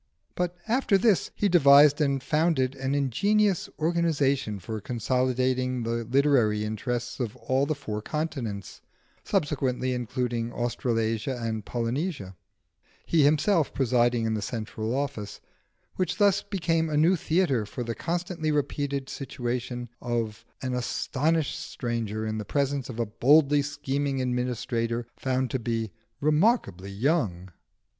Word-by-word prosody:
But 180 0 -2
after 230 -3 +3
this 205 -1 +2
he 205 - +1
devised 145 -4 +7
and 140 -3 +1
founded 150 -4 +1
an 135 0 -2
ingenious 195 - +2
organisation 150 -9 +1
for 110 +3 -6
consolidating 125 +1 0
the 115 0 -2
literary 120 -5 +3
interests 120 +3 -3
of 115 -4 -3
all 135 +2 0
the 155 - 0
four 110 -7 -5
continents 120 - -4 0.4
(subsequently 135 -8 0
including 120 -1 -2
Australasia 120 0 -1
and 110 -2 -3
Polynesia), 120 - -3 0.7
he 165 - +3
himself 155 +3 +3
presiding 120 -2 +2
in 110 - 0
the 110 - -1
central 110 +1 -3
office, 135 -7 -3 0.6
which 185 - -1
thus 200 -2 +4
became 165 -5 0
a 150 - 0
new 165 +5 +5
theatre 160 - +1
for 125 - -5
the 115 0 -3
constantly 170 - -2
repeated 140 -1 -1
situation 125 -2 -4
of 115 -2 -2 0.2
an 130 -1 -2
astonished 145 +5 0
stranger 115 -3 -3
in 110 0 -2
the - - -3
presence 140 +2 -1
of 120 -2 -6
a 115 - +1
boldly 145 +6 +4
scheming 140 -1 -2
administrator 125 -2 -1
found 130 -2 -1
to 130 - -1
be 115 -2 -2 0.3
remarkably 150 - +2
young. 100 - 0
130 Hz, 130 wpm, -27 LUFS, 115-150 Hz, 0.7 s, devised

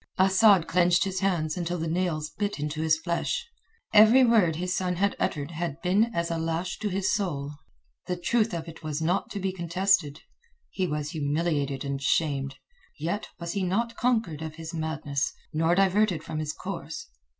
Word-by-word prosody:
Asad 190 -1 +5
clenched 175 0 +3
his 190 -1 -2
hands 170 -6 0
until 175 0 -2
the 165 0 -3
nails 160 -3 -1
bit 200 +3 -3
into 150 +1 -3
his 160 -1 +3
flesh. 175 - -2 0.5
Every 220 +5 +8
word 210 -9 +4
his 180 +2 -2
son 180 -1 -1
had 200 +3 +1
uttered 145 +1 -1
had 165 -2 -4
been 190 +5 +4
as 170 -8 -2
a 165 - -1
lash 165 +2 -2
to 210 - -1
his 190 0 0
soul. 145 -9 -2 0.6
The 180 -1 -1
truth 220 +5 +1
of 170 -2 -4
it 165 - -10
was 155 -2 -3
not 175 +4 0
to 200 - -5
be 190 -1 -2
contested. 175 -3 +1 0.5
He 185 -2 -1
was 150 -1 -3
humiliated 145 -2 -1
and 140 0 -3
shamed. 140 -2 0 0.4
Yet 170 +7 -3
was 170 0 -4
he 200 - -2
not 230 +6 0
conquered 225 -12 0
of 160 -1 -6
his 165 +1 -7
madness, 155 -3 -2 0.2
nor 165 +2 +2
diverted 195 -3 +2
from 155 - -4
his 155 -1 -2
course. - - -6
170 Hz, 180 wpm, -27 LUFS, 155-195 Hz, 0.6 s, Every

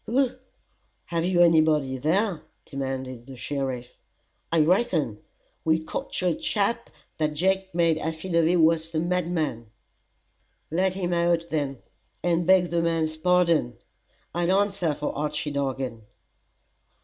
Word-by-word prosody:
"Who? 255 +2 +2 0.7
Have 170 -1 -1
you 180 -1 +3
any 165 -2 +6
body 150 -4 +1
there?" 175 - +1 0.2
demanded 130 -3 -5
the 135 - -9
sheriff. 130 -1 -4 0.5
"I 165 -1 +4
reckon! 165 - +1 0.4
We 160 0 +3
cocht 160 - -5
a 180 -2 +3
chap 220 +7 -1 0.3
that 155 -1 0
Jake 190 +2 0
made 165 -2 +3
affidavy 165 +1 +1
was 165 -1 +3
the 160 -1 -1
madman." 165 -9 -1 1.0
"Let 185 +3 +1
him 180 -2 -1
out 170 -1 +2
then, 140 -4 -2 0.4
and 175 -1 +1
beg 185 -2 +5
the 170 0 +2
man's 165 -1 0
pardon. 170 -6 +2 0.6
I'll 175 +3 +2
answer 195 -6 0
for 150 - -3
Archy 150 +1 -2
Dargan." 135 -4 -3
165 Hz, 125 wpm, -26 LUFS, 145-180 Hz, 1.0 s, any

